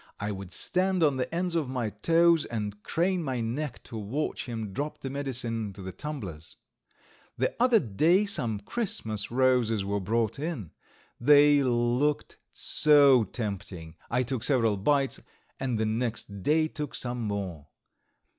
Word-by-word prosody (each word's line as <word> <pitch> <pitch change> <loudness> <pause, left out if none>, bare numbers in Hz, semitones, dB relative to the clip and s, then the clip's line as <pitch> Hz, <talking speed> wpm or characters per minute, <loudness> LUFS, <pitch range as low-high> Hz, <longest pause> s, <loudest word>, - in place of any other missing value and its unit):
I 105 +1 -2
would 95 -2 -7
stand 185 -1 0
on 145 -4 +3
the 125 - -2
ends 175 +1 -1
of 160 -6 0
my 125 -5 -2
toes 165 +8 +3
and 105 -3 -4
crane 175 - 0
my 130 -4 -2
neck 125 +4 -3
to - - -10
watch 115 +10 -3
him 110 -4 -5
drop 145 +7 -4
the 135 - -4
medicine 125 -5 -2
into 100 -1 -9
the 95 0 -6
tumblers. 100 - -7 0.8
The - - 0
other 245 -2 +5
day 165 - +2
some 115 - 0
Christmas 110 - -2
roses 120 -5 +2
were 100 +1 -1
brought 110 +5 -1
in. 145 - -4 0.5
They 145 +2 +6
looked 125 +3 0
so 140 -6 +5
tempting 95 -7 -5 0.2
I 125 +2 +1
took 125 -2 -3
several 115 -7 +3
bites, 135 +7 +1 0.4
and 130 -3 -1
the 110 - 0
next 110 -3 -2
day 155 - +2
took 150 -3 -6
some 120 -1 -3
more. 95 -9 -4
125 Hz, 150 wpm, -28 LUFS, 105-150 Hz, 0.8 s, They